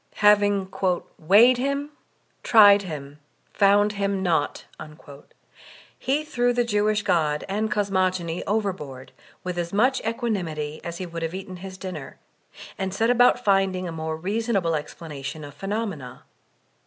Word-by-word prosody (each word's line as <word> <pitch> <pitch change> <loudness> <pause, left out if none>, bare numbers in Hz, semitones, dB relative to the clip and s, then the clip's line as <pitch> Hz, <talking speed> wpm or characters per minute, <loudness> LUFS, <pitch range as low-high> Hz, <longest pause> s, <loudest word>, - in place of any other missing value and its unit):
Having 205 -2 +4 0.5
''weighed 215 +10 +6
Him, 280 +3 -2 0.5
tried 205 -3 +7
Him, 150 -5 -8 0.3
found 205 +1 +4
Him 200 -1 -1
naught,'' 160 -5 0 1.3
he 290 +3 0
threw 245 -4 +1
the 245 0 +2
Jewish 210 -1 +1
God 155 -7 +1
and 210 +3 -1
cosmogony 185 -4 0
over 205 -1 0
board 135 -6 -10 0.3
with 180 -1 -3
as 170 0 -3
much 250 +6 +2
equanimity 175 -10 -3
as 170 0 -5
he 185 - -5
would 170 -1 -7
have 165 +2 -3
eaten 190 -1 -7
his 190 +1 -9
dinner, 180 -8 -7 0.6
and 190 0 -3
set 225 +3 +2
about 245 0 +4
finding 195 -2 +2
a - - -5
more 160 -1 -4
reasonable 200 -1 -1
ex 150 -1 -4
planation 150 -2 -7
of 145 - -12
phenomena. 195 - -5
195 Hz, 140 wpm, -24 LUFS, 165-215 Hz, 1.3 s, tried